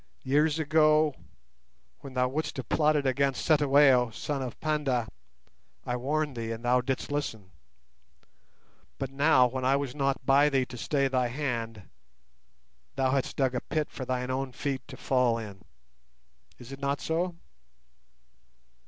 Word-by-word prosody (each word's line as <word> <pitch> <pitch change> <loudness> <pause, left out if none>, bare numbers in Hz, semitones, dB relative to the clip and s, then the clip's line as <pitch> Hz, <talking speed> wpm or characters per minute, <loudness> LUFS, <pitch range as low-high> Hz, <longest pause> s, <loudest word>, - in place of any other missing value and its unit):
Years 150 +3 +2
ago, 155 -1 +3 0.9
when 135 -2 -11
thou 125 0 +2
wouldst 150 +4 -3
have 130 -4 -5
plotted 150 -2 +2
against 135 +1 0
Cetywayo, 140 -5 +5
son 135 +5 -4
of 125 -2 -6
Panda, 145 -7 0 0.8
I 125 - -2
warned 145 +3 -1
thee, 115 -1 -4
and 115 +1 -6
thou 125 +1 +3
didst 130 +2 -3
listen. 110 -10 -4 1.5
But 135 -1 -4
now, 135 -2 +4
when 130 +1 -3
I 135 +2 +3
was 140 -3 -2
not 140 -1 -1
by 140 +2 +5
thee 135 -2 +1
to 125 - -10
stay 140 +4 0
thy 130 -2 +1
hand, 115 - -4 1.1
thou 135 -1 +1
hast 135 -1 -1
dug 130 -2 +1
a 125 - -2
pit 155 -2 -3
for 130 - -6
thine 125 0 -2
own 130 0 -3
feet 135 0 -3
to 130 -3 -10
fall 125 -3 +1
in. 105 -4 -8 1.0
Is 125 +1 -12
it 135 - -8
not 140 0 -1
so? 165 +7 -2
135 Hz, 150 wpm, -28 LUFS, 125-145 Hz, 1.5 s, Cetywayo